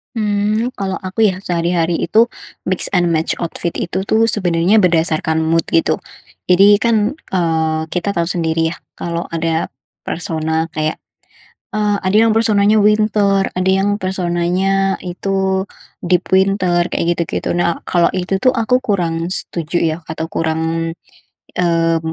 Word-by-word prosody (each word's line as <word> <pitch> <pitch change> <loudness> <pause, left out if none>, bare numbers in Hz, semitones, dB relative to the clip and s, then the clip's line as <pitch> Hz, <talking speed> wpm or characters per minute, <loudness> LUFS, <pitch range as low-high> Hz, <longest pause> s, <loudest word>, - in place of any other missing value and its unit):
Mmm, 210 +2 0
kalau 195 -1 -2
aku, 195 +4 0
ya. 190 -2 0
sehari-hari 170 -1 0
itu 225 +7 +3 0.4
mix 185 - 0
and 175 -1 +3
match 160 0 0
outfit 170 0 -3
itu, 190 +3 -3
tuh, 225 +2 +3
sebenarnya 180 +1 +2
berdasarkan 160 -3 +2
mood, 165 +1 +1
gitu. 330 - +2 0.5
Jadi, 200 +3 +6
kan, 225 +4 +1 0.2
eee, 160 -3 +1
kita 185 +3 -2
tahu 170 -2 0
sendiri, 165 -2 0
ya, 170 - -7 0.2
kalau 170 0 -4
ada 165 0 -1 0.3
persona 160 -1 -2
kayak, 155 -1 -3 0.7
eee, 210 -2 0
ada 190 +2 +1
yang 220 - +2
personanya 215 -1 +3
winter, 210 -2 +2
ada 185 +1 +1
yang 195 +2 +2
personanya 185 +1 0
itu 190 +1 -1 0.4
deep 180 0 +1
winter, 190 -2 +2
kayak 170 +1 0
gitu-gitu. 170 0 -2
Nah, 175 -1 0
kalau 170 -1 +2
itu, 190 +1 -2
tuh, 255 - +5
aku 250 +1 +1
kurang 170 -7 -1
setuju, 170 -2 -1
ya, 160 -2 0
atau 160 0 -3
kurang, 165 0 -2 0.7
eee, 165 -2 +2
180 Hz, 140 wpm, -17 LUFS, 165-200 Hz, 0.7 s, Jadi